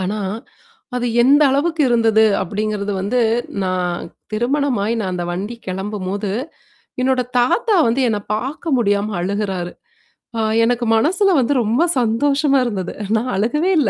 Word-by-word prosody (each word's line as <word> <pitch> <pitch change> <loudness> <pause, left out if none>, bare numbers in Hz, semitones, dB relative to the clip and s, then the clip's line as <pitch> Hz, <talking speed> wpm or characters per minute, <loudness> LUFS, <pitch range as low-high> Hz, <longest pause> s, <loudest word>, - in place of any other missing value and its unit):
ஆனா, 190 +3 -2 0.8
அது 245 - -1 0.2
எந்த 280 +5 +5
அளவுக்கு 315 +3 +1
இருந்தது 225 -2 +4 0.2
அப்டிங்கிறது 205 +1 -2
வந்து 210 +6 0 0.4
நான் 180 -1 -2 0.3
திருமணமாய் 240 -1 0
நான் 190 -4 -2
அந்த 175 - -3
வண்டி 200 +7 -4
கெளம்பும்போது 195 +1 -3 0.7
என்னோட 260 0 +2 0.2
தாத்தா 410 - +2
வந்து 235 +4 +1
என்ன 215 -2 0 0.2
பாக்க 270 +9 -4
முடியாம 205 -2 0
அழுகுறாரு. 190 -2 -2 0.7
ஆ - - -1 0.2
எனக்கு 240 +1 +1
மனசுல 375 - +2
வந்து 255 +2 +1
ரொம்ப 225 +6 +1 0.2
சந்தோஷமா 275 +5 +2
இருந்தது. 195 -6 -3 0.2
நான் 245 +3 -2
அழுகவே 245 - +1
இல்ல. 255 -8 +2
225 Hz, 130 wpm, -19 LUFS, 200-265 Hz, 0.8 s, எந்த